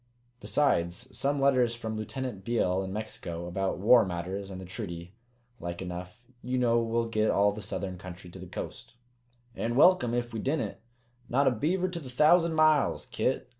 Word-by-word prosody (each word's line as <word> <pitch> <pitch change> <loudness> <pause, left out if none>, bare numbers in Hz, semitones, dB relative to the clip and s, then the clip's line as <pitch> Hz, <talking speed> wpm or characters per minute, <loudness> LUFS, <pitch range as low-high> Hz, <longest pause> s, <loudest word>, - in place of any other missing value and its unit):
Besides, 105 -1 0
some 140 +1 0
letters 130 -4 +3
from 110 -2 -5
Lieutenant 110 -1 -5
Beale 95 -5 +1
in 95 0 -5
Mexico, 95 -5 -5
about 95 +2 -2
war 115 +5 +6
matters 95 +2 -4
and 95 -1 -7
the 95 - -8
treaty, 90 -2 -7 0.5
like 85 0 -5
enough. 90 +4 -7 0.2
You 125 +1 -2
know, 120 -2 +3
we'll 115 0 0
get 110 -1 +1
all 100 +1 +4
the 105 +1 -7
southern 95 -3 -4
country 90 -1 -10
to - - -10
the - - -9
Coast?" - - -7 0.6
"An' 115 +1 -2
welcome 130 -6 +5
ef 120 -1 -2
we 110 - -3
didn't! 145 +7 -1 0.5
Not 140 +4 +3
a - - +5
beaver 175 - 0
to 180 -2 -5
the 135 -6 -9
thousand 160 +5 +4
miles, 155 -2 +3
Kit. 125 +1 -1
115 Hz, 175 wpm, -29 LUFS, 95-130 Hz, 0.6 s, war